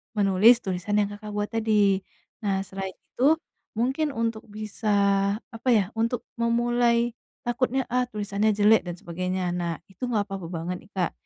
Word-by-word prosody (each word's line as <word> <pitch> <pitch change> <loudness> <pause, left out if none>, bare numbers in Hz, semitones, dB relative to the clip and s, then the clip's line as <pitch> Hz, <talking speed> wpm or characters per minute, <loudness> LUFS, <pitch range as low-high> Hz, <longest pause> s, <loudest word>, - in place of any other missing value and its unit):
menulis 205 +4 +5
tulisan 190 +2 -2
yang 205 - +1
Kakak 210 +1 -8
buat 205 0 -1
tadi. 210 -4 +3 0.4
Nah, 195 -1 0
selain 190 0 -5
itu, 260 - +2 0.4
mungkin 265 +6 0
untuk 230 -1 -1
bisa, 215 +1 -6 0.6
apa 225 +2 -9
ya, 210 - +4 0.2
untuk 230 +1 0 0.2
memulai, 235 0 +2 0.3
"Takutnya, 255 +2 0
ah, 250 0 +2
tulisannya 210 -1 0
jelek," 210 -2 +4
dan 175 - -4
sebagainya, 180 +1 -3
nah, 175 -1 -2 0.2
itu 250 +7 -5
nggak 220 -4 +1
apa-apa 195 -4 -5
banget, 170 +1 -3
nih, - - -37
Kak. 180 -3 +1
210 Hz, 155 wpm, -26 LUFS, 190-235 Hz, 0.6 s, menulis